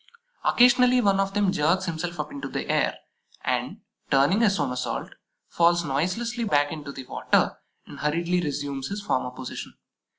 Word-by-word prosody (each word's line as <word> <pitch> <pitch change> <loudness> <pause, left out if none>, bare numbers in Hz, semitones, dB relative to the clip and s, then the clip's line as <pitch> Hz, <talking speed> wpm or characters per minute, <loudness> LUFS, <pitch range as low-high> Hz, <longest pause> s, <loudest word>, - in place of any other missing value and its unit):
Occasionally 250 +1 +5
one 200 -4 +3
of 195 0 -1
them 205 -2 +3
jerks 180 +2 +1
himself 170 0 -4
up 150 0 -3
into 140 -1 -5
the - - -4
air, - - +1 0.5
and, - - -2 0.3
turning 140 +11 +3
a 225 - +5
somersault, 125 - -2 0.4
falls 170 0 +2
noiselessly 205 - -1
back 145 -7 +2
into 150 -3 -6
the 135 -2 -9
water - - +1 0.3
and - - -11
hurriedly 170 +4 0
resumes 140 -3 -3
his 200 0 -5
former 130 -10 0
position. 125 0 -8
170 Hz, 155 wpm, -25 LUFS, 145-200 Hz, 0.5 s, Occasionally